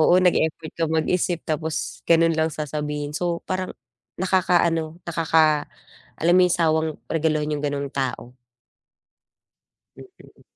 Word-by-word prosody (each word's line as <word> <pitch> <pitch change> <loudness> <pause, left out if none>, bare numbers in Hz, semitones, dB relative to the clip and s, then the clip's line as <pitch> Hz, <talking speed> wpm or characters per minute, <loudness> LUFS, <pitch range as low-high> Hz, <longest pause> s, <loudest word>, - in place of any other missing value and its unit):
oo, 160 - +5
nag-effort 160 -3 +1
ka - - +3
mag-isip, 165 +2 0
tapos 155 0 -3
gano'n 165 0 +5
lang 160 0 +2
sasabihin, 150 0 -4
so 175 -1 -1
parang 185 0 -2 0.5
nakaka-ano 175 -4 +1
nakaka 160 -2 +3 0.5
alam 170 +2 +2
mo - - +6
'yon, 175 - +1
sawang 160 -1 +2 0.2
regaluhan 155 -2 0
'yong 150 -1 -3
gano'ng 140 -1 -2
tao. 130 -2 -3 1.6
Mm. 380 -1 -16
160 Hz, 120 wpm, -23 LUFS, 150-170 Hz, 1.6 s, mo